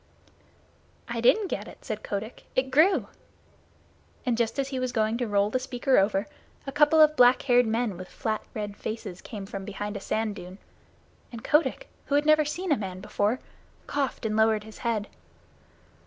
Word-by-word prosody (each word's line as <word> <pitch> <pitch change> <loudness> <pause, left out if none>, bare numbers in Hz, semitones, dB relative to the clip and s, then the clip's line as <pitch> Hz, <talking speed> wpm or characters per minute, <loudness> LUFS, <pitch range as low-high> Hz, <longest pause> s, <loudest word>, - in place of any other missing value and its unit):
"I 235 -1 -3
didn't 410 - +4
get - - -4
it," - - -14
said 215 -3 -4
Kotick. 210 +3 -5
"It 260 0 +1
grew." 330 +8 +4 1.2
And 245 -2 +2
just 230 +1 -1
as 275 -1 -1
he 265 -2 -3
was 255 -1 -1
going 220 -2 +1
to 245 - -1
roll 205 0 +2
the 255 - +1
speaker 255 0 +2
over, 195 +1 +1 0.4
a 275 - -4
couple 295 +2 +4
of 305 0 +7
black 250 -1 +5
haired 245 -3 +4
men 225 -3 -1
with 185 0 -8
flat 215 +2 -3
red 205 -2 -4
faces 210 -5 -6
came 205 -4 -7
from 195 0 -6
behind 205 +1 -5
a - - -3
sand 215 +1 -2
dune, 180 +2 -9 0.7
and 230 -2 -8
Kotick, 330 +11 +1 0.2
who 285 - +1
had 290 +1 +3
never 305 0 +5
seen 350 +4 -3
a 290 - +4
man 190 -3 -5
before, 210 +4 0 0.5
coughed 275 -4 -2
and 215 -1 0
lowered 220 -1 +3
his 220 0 -12
head. 220 -3 -1
230 Hz, 185 wpm, -27 LUFS, 210-270 Hz, 1.2 s, of